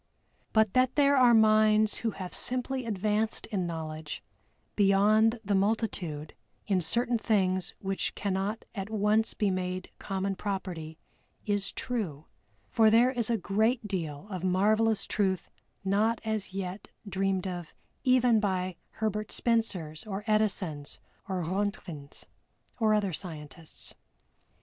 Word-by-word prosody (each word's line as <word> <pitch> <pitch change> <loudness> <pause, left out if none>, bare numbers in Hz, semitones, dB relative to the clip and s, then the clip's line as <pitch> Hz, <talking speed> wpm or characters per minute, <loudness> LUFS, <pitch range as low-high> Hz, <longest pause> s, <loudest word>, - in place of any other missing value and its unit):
But 220 -3 +3
that 255 0 +3
there 285 -1 +5
are 250 -3 +6
minds 215 -1 +4
who 230 - -1
have 185 -3 -7
simply 255 0 -3
advanced 215 +1 0
in 185 -4 -1
knowledge 155 -2 -5 0.5
beyond 215 +3 +4
the 205 - +1
multitude 190 -7 -1 0.3
in 190 -3 +1
certain 235 +8 +1
things 185 -5 +1
which 195 -1 -2
cannot 200 +2 -2
at 195 -1 -5
once 215 +1 +1
be 205 -3 +1
made 185 0 -3
common 195 0 -2
property 180 -6 -4 0.5
is 205 -2 0
true, 185 - -3 0.4
for 220 -1 +4
there 235 +3 +5
is 240 -3 -1
a 230 - +2
great 220 +4 +1
deal 165 -6 -4
of 185 -2 -4
marvelous 210 +4 +2
truth 190 -3 -1 0.3
not 215 +4 +2
as 215 -3 -2
yet 190 0 -5 0.2
dreamed 195 -1 0
of 175 -3 -5 0.3
even 250 -3 +4
by 185 -3 -1 0.2
HERBERT 215 -1 -2
SPENCERS 200 -8 -1
or 200 0 -4
EDISONS, 190 -9 0 0.3
by 190 - -2
RONTGENS 180 -4 -4 0.5
or 215 -2 +4
other 200 -4 0
scientists. 155 -2 -8
200 Hz, 125 wpm, -29 LUFS, 185-220 Hz, 0.5 s, are